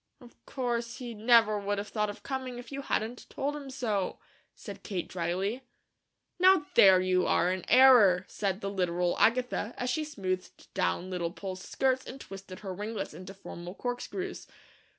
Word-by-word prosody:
"Of 245 -3 -18
course 235 -3 -2
he 245 -3 -6
never 220 -1 +4
would 205 0 -2
have 205 +1 -4
thought 210 -1 -1
of 205 - -8
coming, 260 -2 -4
if 245 +2 -10
you 275 0 -4
hadn't 240 -2 -3
told 285 +2 -2
him 285 -2 -7
so," 220 -7 -2 0.4
said - - -9
Kate 190 -5 -4
dryly. 185 +7 -2 0.8
"Now 370 -3 +6
THERE 190 -2 +7
you 185 -1 +2
are 180 - +3
in 185 -2 -5
error," 225 -9 +7
said 195 -1 -2
the 200 - -2
literal 180 -2 0
Agatha, 245 -1 +2
as 250 0 -1
she 310 +5 0
smoothed 185 -12 -5
down 175 - -1
Little 175 -2 -1
Poll's 185 +1 -7
skirts 260 +4 0
and 270 - -8
twisted 195 -3 -10
her 195 -3 -5
ringlets 210 0 -4
into 185 +4 -9
formal 175 -1 -9
corkscrews. 310 - -4
210 Hz, 170 wpm, -30 LUFS, 185-250 Hz, 0.8 s, THERE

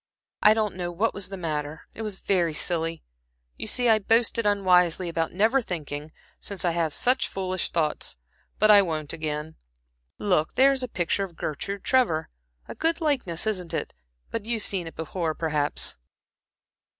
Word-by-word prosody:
"I 210 +1 +7
don't 215 -4 0
know 175 -1 -3
what 205 +7 0
was 200 -2 -2
the 195 - -6
matter 155 -3 -4
it - - -8
was 215 -3 -3
very 175 -5 0
silly. 165 -1 -1 0.5
You - - -6
see 245 +3 +3
I 220 -1 +5
boasted 225 +1 +2
unwisely 180 -3 +3
about 165 -1 -1
never 220 +8 +3
thinking, 150 - -5 0.3
since 195 -3 -4
I 175 - +3
have 165 -2 0
such 255 +2 +2
foolish 185 -1 -2
thoughts; 155 - -1 0.4
but 215 +1 +5
I 205 -1 +9
won't 155 -5 -3
again. 155 -1 -4 0.6
Look, 180 -6 +1
there 270 +1 +6
is 270 -1 -1
a 255 - -1
picture 190 -2 0
of 180 -4 -7
Gertrude 195 +6 -4
Trevor. 240 -12 +2 0.4
A - - -6
good 330 +1 +1
likeness, 260 - -1
isn't 185 -6 -2
it? - - -3 0.4
But 225 - -3
you've 225 -1 -2
seen 185 -4 -1
it 165 - -9
before, 160 0 -3
perhaps?" 150 -3 0
185 Hz, 170 wpm, -26 LUFS, 160-215 Hz, 0.6 s, I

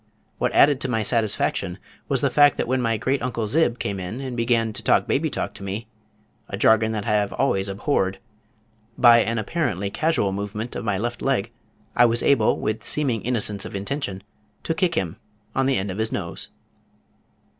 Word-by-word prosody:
What - - +1
added 140 -1 +5
to - - -1
my 110 -3 0
satisfaction 105 -5 0 0.3
was 135 -3 +1
the 140 - +1
fact 145 +1 +5
that - - -1
when 130 +1 +1
my 115 -2 +1
great 130 +5 -1
uncle 120 -2 -2
Zib 120 +1 +2
came 100 -4 -3
in 95 +7 -5
and 130 -2 -5
began 115 -2 +1
to - - -2
talk - - +3
baby - - 0
talk - - -4
to - - -11
me 100 +4 -4 0.6
a 100 - -4
jargon 110 +1 +4
that 105 -2 -3
I - - -2
have 105 -1 +1
always 100 -8 0
abhorred 95 -2 0 0.8
by 120 -1 +7
an 115 0 0
apparently 100 - -2
casual 155 -10 +1
movement 105 +4 -5
of - - -4
my 105 -3 0
left 120 +4 -3
leg 120 -5 0 0.4
I 120 - +6
was 115 0 +1
able 120 -6 +3
with 110 +1 -2
seeming 130 -8 -1
innocence 105 -4 -1
of - - -7
intention 100 -2 -4 0.4
to 165 - -1
kick 170 0 0
him 90 - -2 0.4
on 135 0 +1
the 135 - +2
end 95 +1 -2
of 95 - -6
his 110 0 -1
nose. 85 -3 -4
115 Hz, 195 wpm, -23 LUFS, 100-130 Hz, 0.8 s, by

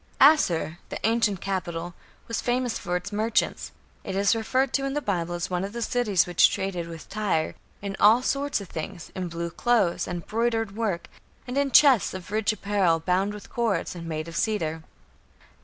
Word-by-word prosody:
" - - -34
Asshur, 175 - +4
the - - -4
ancient 225 -4 +2
capital, 175 -3 -3 0.3
was 230 - -2
famous 245 -1 0
for 175 - -2
its 180 +3 -3
merchants. 215 +2 0 0.3
It 190 - -4
is 200 +2 +3
referred 255 +4 0
to 275 - +1
in 275 +1 -2
the - - +2
Bible 175 - -2
as 175 +1 -4
one 180 0 0
of 200 +2 -5
the 235 0 -3
cities 215 -7 +2
which 175 -1 +5
traded 180 -3 -3
with 165 -1 -9
Tyre 195 -7 -1 0.3
"in 200 -1 -3
all 225 +4 +6
sorts 280 0 0
of 200 - -8
things, 170 +2 -7
in 185 -1 -3
blue 170 0 -4
clothes, 210 -3 +1
and 175 -2 -5
broidered 225 -2 -1
work, 210 -6 -2 0.4
and 250 - -4
in 280 0 +2
chests 265 -8 +5
of 185 +1 -8
rich 215 0 +1
apparel, 200 -5 +1
bound 185 +4 +1
with 210 -1 -10
cords, 235 -4 0
and 170 -2 -8
made 155 0 -3
of 165 - -8
cedar". 160 -8 -1
200 Hz, 190 wpm, -26 LUFS, 175-230 Hz, 0.4 s, all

